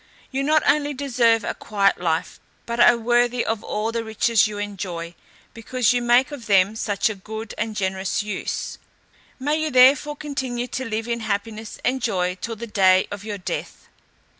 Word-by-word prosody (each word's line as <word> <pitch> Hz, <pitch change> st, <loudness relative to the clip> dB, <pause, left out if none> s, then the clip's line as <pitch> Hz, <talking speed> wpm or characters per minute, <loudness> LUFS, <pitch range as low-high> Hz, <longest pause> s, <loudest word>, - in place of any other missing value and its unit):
You 270 Hz, 0 st, -1 dB
not 305 Hz, +2 st, +3 dB
only 290 Hz, -1 st, +2 dB
deserve 235 Hz, -4 st, +2 dB
a -, -, -2 dB
quiet 200 Hz, -2 st, +1 dB
life, 165 Hz, -2 st, -1 dB, 0.3 s
but 235 Hz, 0 st, -4 dB
are 240 Hz, -, +7 dB
worthy 240 Hz, +1 st, +1 dB
of 225 Hz, -1 st, -2 dB
all 215 Hz, +2 st, -2 dB
the 230 Hz, 0 st, -2 dB
riches 220 Hz, 0 st, +2 dB
you 210 Hz, -1 st, -6 dB
enjoy, 185 Hz, -5 st, -5 dB, 0.4 s
because 245 Hz, +1 st, 0 dB
you 245 Hz, -, +1 dB
make 240 Hz, +4 st, +3 dB
of 275 Hz, -5 st, -8 dB
them 195 Hz, +1 st, +4 dB
such 205 Hz, -2 st, 0 dB
a 215 Hz, -, -1 dB
good 220 Hz, +2 st, -8 dB
and 220 Hz, 0 st, -3 dB
generous 190 Hz, -1 st, -1 dB
use. 210 Hz, -2 st, -4 dB, 0.6 s
May 295 Hz, +4 st, 0 dB
you 310 Hz, -, 0 dB
therefore 275 Hz, +3 st, +5 dB
continue 265 Hz, -5 st, -3 dB
to 260 Hz, -, -4 dB
live 220 Hz, +1 st, -3 dB
in 235 Hz, 0 st, -1 dB
happiness 215 Hz, 0 st, -4 dB
and 260 Hz, +1 st, +1 dB
joy 180 Hz, -5 st, 0 dB
till 230 Hz, -1 st, -4 dB
the 230 Hz, +2 st, -7 dB
day 190 Hz, -4 st, +3 dB
of 205 Hz, 0 st, -6 dB
your 210 Hz, -1 st, -5 dB
death!" 180 Hz, -, -6 dB
225 Hz, 180 wpm, -23 LUFS, 205-245 Hz, 0.6 s, are